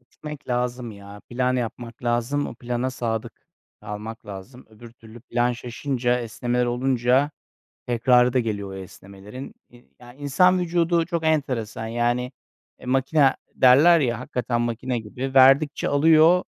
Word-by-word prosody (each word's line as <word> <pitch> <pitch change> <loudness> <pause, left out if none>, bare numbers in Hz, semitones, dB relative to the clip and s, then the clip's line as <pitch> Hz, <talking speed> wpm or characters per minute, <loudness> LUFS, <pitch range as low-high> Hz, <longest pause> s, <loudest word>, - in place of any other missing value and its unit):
Gitmek 150 +3 -11
lazım 125 -1 -2
ya. 100 0 -12
Plan 125 +1 0
yapmak 120 0 -6
lazım. 120 +5 0
O - - -8
plana 125 +1 -3
sadık 115 -2 -5 0.3
kalmak 105 +2 -8
lazım. 105 +6 -10
Öbür 115 +2 -14
türlü 115 0 -15
plan 120 0 0
şaşınca, 125 0 -2
esnemeler 120 +2 -2
olunca 125 +3 +1 0.6
tekrarı 125 +1 +3
da 130 - +3
geliyor 100 -4 -3
o - - -8
esnemelerin. 100 +6 -10 0.2
İii, 120 - -20
ya, 120 0 -14
insan 165 +7 +2
vücudu 170 -1 +1
çok 170 -2 -3
enteresan. 125 -8 -1
Yani, 120 +2 -1 0.5
eee, - - -13
makina 135 +2 +2 0.2
derler 150 +7 +6
ya, 120 -4 -1
hakikaten 120 -2 -2
makine 120 +1 -2
gibi. 125 +5 -6
Verdikçe 135 +3 +5
alıyor, 160 +4 +5
125 Hz, 140 wpm, -23 LUFS, 115-135 Hz, 0.6 s, derler